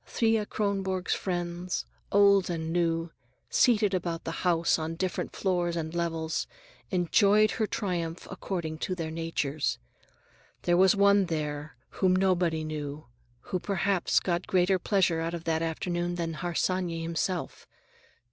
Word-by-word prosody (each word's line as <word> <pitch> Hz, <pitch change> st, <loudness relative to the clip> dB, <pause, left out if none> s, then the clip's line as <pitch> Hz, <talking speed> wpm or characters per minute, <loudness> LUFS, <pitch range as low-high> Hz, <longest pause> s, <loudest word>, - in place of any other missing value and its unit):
Thea 225 Hz, -2 st, +1 dB
Kronborg's 195 Hz, -3 st, -1 dB
friends, 175 Hz, -1 st, -3 dB, 0.3 s
old 200 Hz, -2 st, +5 dB
and 165 Hz, -1 st, -3 dB
new, 165 Hz, -1 st, 0 dB, 0.4 s
seated 210 Hz, -5 st, +4 dB
about 170 Hz, -2 st, -2 dB
the -, -, -3 dB
house 170 Hz, -2 st, +2 dB
on 160 Hz, +1 st, -3 dB
different 185 Hz, +1 st, -3 dB
floors 175 Hz, -3 st, 0 dB
and 160 Hz, -1 st, -3 dB
levels, 165 Hz, -2 st, -2 dB, 0.4 s
enjoyed 200 Hz, +4 st, +4 dB
her 220 Hz, -, -1 dB
triumph 175 Hz, -6 st, -3 dB
according 170 Hz, -4 st, -4 dB
to 185 Hz, -, -2 dB
their 165 Hz, -3 st, -4 dB
natures. 160 Hz, -3 st, -1 dB, 0.9 s
There 175 Hz, -, +3 dB
was 190 Hz, +2 st, +5 dB
one 200 Hz, 0 st, +5 dB
there, 150 Hz, -3 st, -3 dB
whom 185 Hz, -1 st, +2 dB
nobody 180 Hz, -4 st, +2 dB
knew, 150 Hz, -3 st, -5 dB, 0.3 s
who 185 Hz, -, -3 dB
perhaps 195 Hz, -1 st, +1 dB
got 175 Hz, -1 st, -2 dB
greater 185 Hz, 0 st, +3 dB
pleasure 185 Hz, -3 st, +2 dB
out 165 Hz, +1 st, -2 dB
of 165 Hz, -, -7 dB
that 160 Hz, -1 st, 0 dB
afternoon 175 Hz, +2 st, -2 dB
than 165 Hz, -1 st, -2 dB
Harsanyi 175 Hz, +1 st, -1 dB
himself. 170 Hz, +2 st, -3 dB
175 Hz, 135 wpm, -28 LUFS, 165-190 Hz, 0.9 s, old